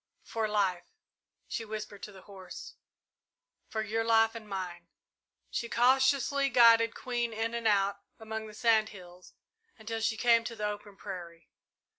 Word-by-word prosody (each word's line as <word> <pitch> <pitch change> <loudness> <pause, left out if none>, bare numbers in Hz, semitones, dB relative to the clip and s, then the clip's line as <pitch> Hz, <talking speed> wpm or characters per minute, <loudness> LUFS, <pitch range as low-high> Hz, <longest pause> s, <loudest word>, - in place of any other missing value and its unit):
"For 225 -1 -2
life," 195 -4 0 0.6
she 230 - -3
whispered 215 -2 -7
to 210 - -7
the 190 -2 -14
horse; 190 -3 -10 0.9
"for 220 -1 -3
your 225 +2 -1
life 225 0 +4
and 220 -2 -9
mine!" 180 -3 -5 0.6
She 235 - -3
cautiously 270 +3 +3
guided 230 -2 +6
Queen 240 -2 -2
in 225 +1 -2
and 235 -1 -1
out 200 -1 +2 0.2
among 220 0 -5
the 210 - -12
sand 220 -1 +3
hills 180 -2 -14 0.4
until 225 0 -5
she 225 0 0
came 230 0 +4
to 230 - -5
the 210 - -3
open 205 -1 -5
prairie. 175 -5 -9
220 Hz, 150 wpm, -30 LUFS, 200-230 Hz, 0.9 s, guided